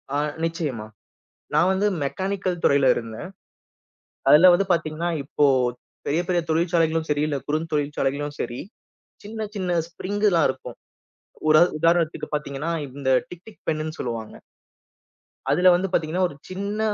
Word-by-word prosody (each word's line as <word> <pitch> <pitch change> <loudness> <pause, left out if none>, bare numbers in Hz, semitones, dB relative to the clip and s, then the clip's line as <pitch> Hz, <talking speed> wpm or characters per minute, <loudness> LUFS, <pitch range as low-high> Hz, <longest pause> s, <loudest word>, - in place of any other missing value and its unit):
அ - - +2 0.3
நிச்சியமா, 155 -10 -2 0.7
நான் 180 - +4
வந்து 195 +2 +1 0.2
மெக்கானிக்கல் 185 +3 -2
துறையில 140 -1 +4
இருந்தேன். 115 +9 -6 1.0
அதுல 155 +6 +8
வந்து 195 +3 +2
பாத்தீங்கன்னா, 165 0 0
இப்போ 145 +1 +1 0.6
பெரிய 160 +4 +1
பெரிய 175 -2 +1
தொழிற்சாலைகளும் 165 -1 +1
சரி 145 0 +1
இல்ல 145 -2 -1
குறுந்தொழிற்சாலைகளும் 145 -2 -1
சரி, 120 - -4 0.6
சின்ன 215 +1 -5
சின்ன 180 -3 0
ஸ்பிரிங்கு 205 +4 0
தான் 165 - +4
இருக்கும். - - -6 0.7
உரா 155 +1 +7 0.2
உதாரணத்துக்கு 165 -1 +1
பாத்தீங்கன்னா, 150 +2 -3 0.2
இந்த 130 0 -3 0.2
டிக் 180 +1 -12
டிக் 220 - -15
பென்னுன்னு 155 0 -2
சொல்லுவாங்க. 115 -3 -4 1.2
அதுல 180 +1 +5
வந்து 190 +2 -1
பாத்தீங்கன்னா, 165 +3 0
ஒரு 145 - -11
சின்ன 200 +3 -4
165 Hz, 130 wpm, -24 LUFS, 145-180 Hz, 1.2 s, அதுல